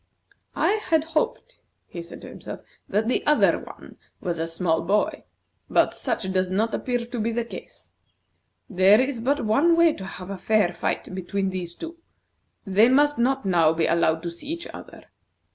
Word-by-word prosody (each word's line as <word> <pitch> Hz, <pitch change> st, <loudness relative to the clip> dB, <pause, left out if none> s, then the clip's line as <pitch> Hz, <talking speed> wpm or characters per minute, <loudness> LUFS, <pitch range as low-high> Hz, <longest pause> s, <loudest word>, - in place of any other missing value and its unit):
"I 425 Hz, +1 st, +2 dB
had 320 Hz, -2 st, +3 dB
hoped," 460 Hz, +11 st, -2 dB, 0.2 s
he 170 Hz, -, -8 dB
said 170 Hz, -, -9 dB
to -, -, -10 dB
himself, -, -, -9 dB, 0.3 s
"that 215 Hz, +2 st, +1 dB
the 250 Hz, -, +1 dB
other 300 Hz, 0 st, +4 dB
one -, -, -12 dB, 0.2 s
was 170 Hz, -2 st, -3 dB
a 165 Hz, -, -1 dB
small 165 Hz, -1 st, 0 dB
boy, 200 Hz, +5 st, 0 dB, 0.4 s
but -, -, +3 dB
such 190 Hz, -2 st, -3 dB
does 185 Hz, -1 st, +1 dB
not 215 Hz, +4 st, 0 dB
appear 245 Hz, -2 st, -1 dB
to 240 Hz, 0 st, -6 dB
be 225 Hz, +2 st, 0 dB
the 235 Hz, 0 st, -2 dB
case. -, -, -10 dB, 0.8 s
There 195 Hz, -1 st, +5 dB
is 260 Hz, -1 st, 0 dB
but 270 Hz, +3 st, 0 dB
one 290 Hz, +11 st, +4 dB
way 335 Hz, -1 st, +5 dB
to 190 Hz, -, -8 dB
have 190 Hz, 0 st, -8 dB
a 195 Hz, -, -6 dB
fair 205 Hz, -2 st, +2 dB
fight 185 Hz, -, -3 dB
between 190 Hz, +1 st, -2 dB
these 175 Hz, -2 st, -5 dB
two. 335 Hz, +1 st, -8 dB, 0.7 s
They 205 Hz, +4 st, +4 dB
must 290 Hz, +1 st, +3 dB
not 265 Hz, +1 st, +1 dB
now 170 Hz, -4 st, +4 dB
be 165 Hz, 0 st, +1 dB
allowed 165 Hz, -1 st, +2 dB
to 170 Hz, -, -3 dB
see 170 Hz, +10 st, -8 dB
each 335 Hz, +3 st, -4 dB
other. -, -, -11 dB
210 Hz, 180 wpm, -24 LUFS, 180-270 Hz, 0.8 s, There